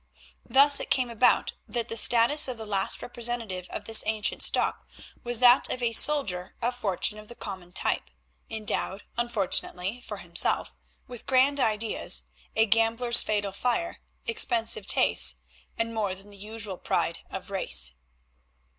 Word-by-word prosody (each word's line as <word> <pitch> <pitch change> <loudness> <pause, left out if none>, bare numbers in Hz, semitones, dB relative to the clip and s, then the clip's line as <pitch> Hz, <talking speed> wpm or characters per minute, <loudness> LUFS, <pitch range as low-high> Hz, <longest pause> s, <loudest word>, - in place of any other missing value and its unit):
Thus 280 +1 +7
it - - -6
came 250 -2 0
about 235 +2 +2
that 235 -2 -3
the 225 - -5
status 240 +7 +5
of 255 -2 -5
the 220 - -7
last 200 -2 -2
representative 235 -7 -3
of - - -7
this 225 -1 +5
ancient 220 -1 -2
stock - - +2 0.4
was 240 -1 0
that 245 +1 +5
of 250 - -4
a 230 -1 0
soldier 205 -11 +2
of 240 +1 -1
fortune 210 -1 -2
of 215 - -13
the 240 - -12
common 190 -5 -9
type, - - -1 0.4
endowed, 215 -2 -3
unfortunately 210 -2 -1
for - - -8
himself, - - -1 0.3
with 245 -2 -11
grand 270 +2 +3
ideas, 220 -2 0 0.3
a 220 - +4
gambler's 230 +2 +3
fatal 205 -2 -1
fire, 250 - -2 0.3
expensive 230 - 0
tastes, - - +3 0.4
and 230 0 -2
more 205 -4 -2
than 195 +2 -14
the - - -10
usual 210 -2 -6
pride - - -2
of - - -7
race. - - -3
225 Hz, 150 wpm, -26 LUFS, 205-245 Hz, 0.4 s, Thus